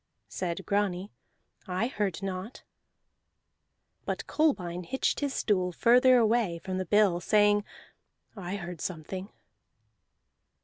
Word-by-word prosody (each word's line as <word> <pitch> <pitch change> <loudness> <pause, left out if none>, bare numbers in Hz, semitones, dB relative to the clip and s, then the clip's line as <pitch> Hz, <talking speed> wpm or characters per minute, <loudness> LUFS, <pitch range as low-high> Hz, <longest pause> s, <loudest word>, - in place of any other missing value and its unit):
Said 175 -2 -4
Grani, 200 -1 -1 0.6
"I 185 +4 0
heard 200 -7 -2
naught." 190 +4 -5 1.4
But - - -3
Kolbein 180 - 0
hitched 265 +10 -1
his 285 -1 -1
stool 185 -4 +1
further 250 +7 +5
away 225 -6 +2
from 185 +2 -4
the 185 - -2
bill, 205 -4 +4
saying: 205 +2 +3 0.7
"I 190 -1 -5
heard 175 -4 -7
something." 185 +3 -5
195 Hz, 105 wpm, -29 LUFS, 180-215 Hz, 1.4 s, further